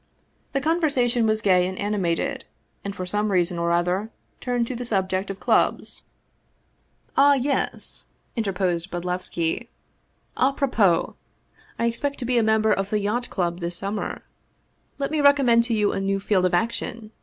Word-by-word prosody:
The 275 - 0
conversation 270 -7 +2
was 215 0 +1
gay 180 -3 +3
and 185 0 -5
animated, 200 -5 -1 0.4
and 200 0 -5
for 185 - -4
some 210 +3 -1
reason 175 -2 +1
or 170 0 0
other 180 +5 0 0.3
turned 245 -2 0
to 255 - -5
the 245 - -4
subject 190 -3 -1
of 195 0 -5
clubs. - - 0 0.5
" - - -41
Ah, 285 +1 +6
yes," 275 +2 -2 0.3
interposed 190 -5 -1
Bodlevski, 175 +2 -2 0.3
" - - -40
a 275 - 0
propos! 220 - +2 0.6
I 235 - 0
expect 275 +5 -1
to 250 - -5
be 245 0 +2
a - - +3
member 220 -1 +3
of 195 0 -2
the 215 - +1
Yacht 215 +5 -2
Club 175 -2 -2
this 170 0 -4
summer. 200 +3 -4 0.7
Let 280 0 -2
me 310 -1 +1
recommend 270 -5 +5
to 235 -2 0
you 210 -1 +2
a - - -2
new 195 0 0
field 195 -2 +1
of 180 - 0
action. 225 +2 -2
210 Hz, 165 wpm, -24 LUFS, 185-240 Hz, 0.7 s, Ah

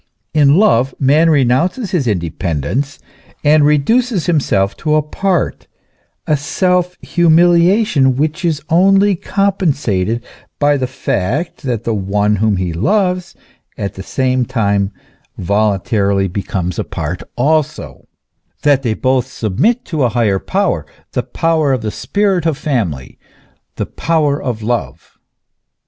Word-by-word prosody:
In 145 -2 +4
love 135 - +3
man 150 +5 +4
renounces 160 - +1
his 160 -10 0
independence, 85 - -2 0.5
and 150 0 +4
reduces 185 - +2
himself 115 - +1
to 155 -1 0
a 155 - +2
part: 180 +4 -2 0.6
a 155 - +2
self 180 +4 0
humiliation 170 - +3
which 155 +6 -1
is 155 -4 -1
only 195 +4 +4
compensated 145 - -1 0.3
by 145 0 +3
the 130 -2 -1
fact 130 - -2
that 120 -6 -3
the 115 - -1
one 105 +1 0
whom 105 -1 +1
he 90 -2 -2
loves 180 - 0 0.4
at 100 -1 -4
the 95 - -8
same 130 +4 0
time 100 -4 0 0.5
voluntarily 100 0 +1
becomes 90 -1 -3
a - - 0
part 80 +3 -5 0.2
also; 145 - -1 0.6
that 145 -2 +3
they 115 -4 -1
both 130 0 0
sub 110 -7 -5
mit 240 +3 +2
to 160 -5 -3
a 125 - +3
higher 110 -5 +1
power, - - -1 0.3
the - - -1
power 160 -4 0
of 125 -4 -2
the 105 - -2
spirit 195 - 0
of 155 -4 0
family, 110 - -3 0.6
the - - -2
power 150 -3 0
of 115 -4 -4
love. 105 - -4
140 Hz, 130 wpm, -16 LUFS, 105-165 Hz, 0.6 s, In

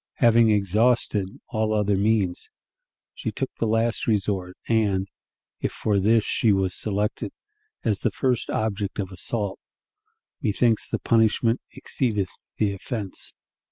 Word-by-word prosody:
Having 115 -2 +5
exhausted 105 0 +2
all 110 -1 0
other 105 -1 +2
means, 100 -3 +1 0.6
she - - -4
took - - -3
the 115 - +1
last 115 +1 +1
resort, 95 -4 0
and, 100 -4 +2 0.5
if - - -1
for 105 -2 0
this 110 +3 +4
she 110 - +2
was 95 -2 +1
selected 105 +1 -2 0.5
as 105 -4 +1
the - - +1
first 125 -4 0
object 105 -2 -2
of 95 -2 -3
assault, 100 +2 -3 0.8
"methinks 110 +2 +2
the - - 0
punishment 115 +1 +2
exceedeth 105 -8 -1 0.3
the 100 -2 +1
offense." 100 0 -6
105 Hz, 125 wpm, -25 LUFS, 100-115 Hz, 0.8 s, Having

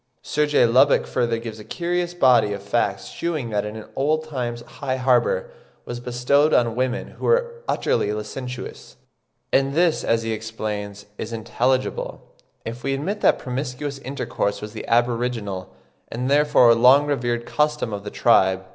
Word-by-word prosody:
Sir 150 0 0
J. 145 - +4
Lubbock 120 +2 +4
further 115 -1 0
gives 115 -1 -7
a - - -9
curious 175 +5 -2
body 125 -9 +4
of 100 -1 -7
facts 100 -2 -1
shewing 155 -9 -3
that 105 -1 0
in 110 0 -7
old 155 +3 +1
times 120 -5 -4
high 130 +1 -4
honour 135 - +1 0.3
was 120 0 -5
bestowed 125 +5 +2
on 115 -2 +2
women 125 0 -1
who - - -8
were 475 0 +1
utterly 105 - 0
licentious; 125 +4 -7 0.6
and 135 +1 +2
this, 170 -1 +2
as 115 0 +1
he 115 - -2
explains, 105 -2 -5
is 110 - -5
intelligible, 125 +3 -2 0.3
if 115 +2 -6
we 135 0 0
admit 190 +10 -3
that - - +4
promiscuous 135 +2 -4
intercourse 130 -6 -3
was 105 0 -8
the 110 - -7
aboriginal, 115 -5 0 0.4
and 125 +3 -2
therefore 145 -5 +5
long 130 +5 +6
revered 120 -5 -1
custom 150 -6 0
of 100 -1 -5
the 105 - -5
tribe. 95 -5 +3
125 Hz, 155 wpm, -23 LUFS, 115-145 Hz, 0.6 s, long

